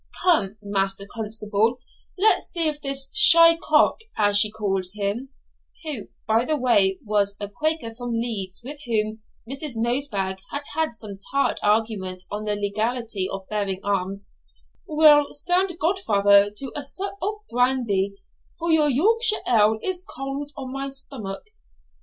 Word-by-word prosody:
Come, 220 - +2
Master 195 -1 -1
Constable, 220 +1 -1 0.4
let's 420 +4 +3
see 335 -3 +2
if 295 -1 -2
this 275 -1 -1
shy 335 -1 +8
cock, 330 - +2 0.2
as 205 -1 +2
she 210 - +6
calls 195 -3 -2
him 210 +6 -3 0.5
(who, 290 -10 -3 0.2
by 220 +1 +3
the 305 +4 0
way, 205 -7 +3
was 205 -1 0
a 205 - -3
Quaker 300 +2 -2
from 245 +1 -5
Leeds, 215 -5 -3
with 290 +4 -8
whom 215 -1 -1 0.3
Mrs. 275 +2 -4
Nosebag 225 -5 -1
had 285 0 -4
had 320 -4 -1
some 215 -4 -8
tart 275 0 +1
argument 205 -4 -1
on 210 +1 -4
the 210 -1 0
legality 215 0 -2
of 195 -1 -6
bearing 200 -3 -2
arms), 195 0 -2 0.6
will 300 -2 +5
stand 355 +3 0
godfather 205 - +3
to 270 +2 -5
a 295 - -2
sup 385 +8 -3
of 415 +3 -1 0.2
brandy, 235 -6 +1 0.4
for 335 0 -1
your 305 -2 +4
Yorkshire 430 - +2
ale 220 -2 +4
is 370 -1 -1
cold 275 -4 -6
on 260 -1 -6
my 275 0 -3
stomach.' 255 -7 -5
230 Hz, 145 wpm, -23 LUFS, 205-290 Hz, 0.6 s, shy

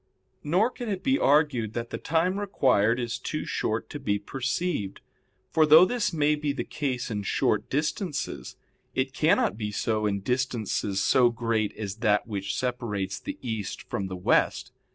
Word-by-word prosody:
Nor 185 +11 +2
can 245 -3 -6
it 195 -3 -3
be 270 +1 +2
argued 135 -7 +2
that 115 0 -4
the - - -4
time 175 +5 +1
required 125 - +2
is 120 -1 -3
too 155 +4 -4
short 110 +1 -2
to 145 - -5
be 105 -6 0
perceived; 125 - -3 0.5
for 160 - +4
though 155 +3 +8
this 240 0 0
may 150 -2 +2
be 150 -1 -1
the - - -3
case 130 -5 -3
in 105 -2 -2
short 100 - 0
distances, 150 +3 -2 0.4
it 130 0 0
cannot 150 - +2
be 105 -2 -3
so 110 0 0
in 100 -1 -1
distances 110 -4 -1
so 125 -2 +5
great 115 -2 -1
as 100 -2 -5
that 105 -2 +2
which 100 -3 -3
separates 105 -7 -2
the - - -6
East 110 -5 -4
from 95 - -3
the 95 -1 -6
West. 90 - +1
125 Hz, 170 wpm, -27 LUFS, 105-150 Hz, 0.5 s, though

